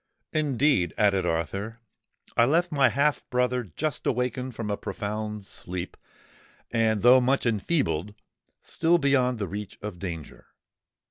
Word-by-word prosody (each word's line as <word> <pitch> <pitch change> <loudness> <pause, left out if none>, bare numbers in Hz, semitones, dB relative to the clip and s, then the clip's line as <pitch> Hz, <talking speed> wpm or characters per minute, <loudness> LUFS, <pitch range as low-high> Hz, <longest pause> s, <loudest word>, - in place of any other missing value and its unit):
"Indeed," 140 - +2
added 100 -3 +3
Arthur, 100 +8 -2 0.6
"I 115 - +5
left 170 +7 +2
my 140 -4 +4
half 140 +5 +1
brother 125 0 +1
just 140 - -3
awakened 125 0 -1
from 110 -2 -3
a - - +1
profound 105 -1 -4
sleep, 90 -1 -6 0.8
and, 110 -3 +1
though 125 +2 +8
much 130 +2 +1
enfeebled, 105 - 0 0.5
still 170 +1 +2
beyond 135 -5 +2
the 100 -3 -3
reach 100 +1 -6
of 105 -4 -7
danger. 85 -5 -7
115 Hz, 130 wpm, -26 LUFS, 100-130 Hz, 0.8 s, though